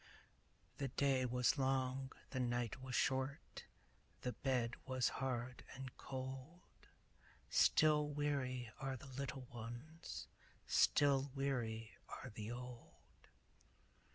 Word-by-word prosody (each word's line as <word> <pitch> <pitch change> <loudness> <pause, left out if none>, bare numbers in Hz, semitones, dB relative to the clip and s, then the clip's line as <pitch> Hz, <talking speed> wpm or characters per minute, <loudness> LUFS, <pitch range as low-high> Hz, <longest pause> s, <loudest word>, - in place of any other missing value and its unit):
The 140 - +1
day 130 -1 +3
was 125 +2 +3
long, 130 0 +1 0.2
the 130 - -1
night 120 0 0
was 130 -1 -3
short, 130 +2 0 0.6
The 125 - -1
bed 125 -3 +1
was 130 -1 +3
hard 125 -1 -1
and 135 -1 -6
cold; 135 +6 -7 0.6
Still 150 -1 +6
weary 140 -5 0
are 135 -1 -2
the 125 - -11
little 135 0 -4
ones, 120 +8 -6 0.4
Still 140 -1 +5
weary 115 -5 -1 0.2
are 130 - -6
the 105 0 -5
old. 125 0 -9
130 Hz, 105 wpm, -40 LUFS, 125-135 Hz, 0.6 s, Still